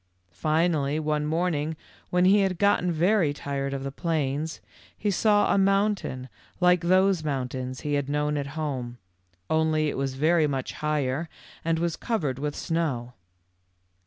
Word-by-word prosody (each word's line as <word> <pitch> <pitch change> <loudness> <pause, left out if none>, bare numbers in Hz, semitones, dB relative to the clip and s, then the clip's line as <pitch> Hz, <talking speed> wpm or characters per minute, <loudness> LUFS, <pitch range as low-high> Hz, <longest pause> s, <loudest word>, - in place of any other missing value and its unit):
Finally, 155 - +1
one 150 -1 -1
morning 160 -1 0 0.3
when 180 0 +3
he 200 +3 +6
had 190 -3 +1
gotten 190 -2 +2
very 170 -1 +2
tired 140 -1 -3
of 135 -1 -4
the 135 - -4
plains, 155 0 -2 0.4
he 210 - 0
saw 205 +2 +3
a - - +3
mountain 195 -9 +1 0.3
like 180 -1 +4
those 185 0 +3
mountains 130 -3 -3
he 150 - -2
had 140 -1 0
known 150 +1 0
at 140 -1 -2
home, 130 -6 -3 0.5
only 155 -1 +2
it - - -4
was 135 -1 -2
very 155 +3 +3
much 135 -2 -3
higher 150 +1 -1 0.3
and 165 0 +1
was 170 0 -1
covered 150 - -2
with 145 0 -3
snow. 140 -8 -2
155 Hz, 150 wpm, -26 LUFS, 140-175 Hz, 0.5 s, he